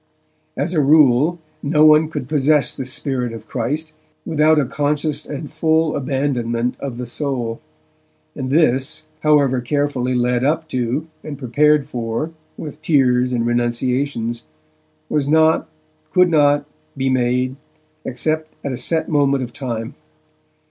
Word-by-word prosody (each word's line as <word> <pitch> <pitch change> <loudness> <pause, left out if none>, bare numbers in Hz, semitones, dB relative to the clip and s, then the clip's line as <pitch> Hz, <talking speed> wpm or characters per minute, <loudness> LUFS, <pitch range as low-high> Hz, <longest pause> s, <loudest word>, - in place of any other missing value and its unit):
As 150 +6 -1
a 155 - +3
rule, 145 +2 +4 0.2
no 150 +1 +3
one 155 0 +6
could 130 -5 -5
possess 150 -1 +2
the 135 - -5
Spirit 130 -2 -2
of 110 -1 -10
Christ, 150 +6 -3 0.3
without 155 0 +3
a 145 - +3
conscious 145 +2 -1
and 145 0 -7
full 160 0 +1
abandonment 125 -4 -1
of 135 -4 -5
the 125 - -4
soul, 120 -3 -3 0.7
and 130 -2 -4
this, 135 -1 +2
however 145 -5 +3
carefully 130 -1 -1
led 125 0 +1
up 160 +3 0
to, 125 +4 -1 0.2
and 145 -2 -6
prepared 145 +3 +2
for 120 +3 -3 0.3
with 150 0 -8
tears 130 -5 +2
and 120 -2 0
renunciations, 120 0 -1 0.7
was 145 -2 0
not, 160 +1 +3 0.4
could 180 -1 +4
not, 145 -2 +3 0.3
be 135 0 0
made, 125 +1 +1 0.5
except 155 +5 -2
at 140 - -1
a 125 - -3
set 160 +4 0
moment 140 -3 +2
of 120 -1 -8
time. 115 -5 -5
140 Hz, 135 wpm, -19 LUFS, 125-150 Hz, 0.7 s, one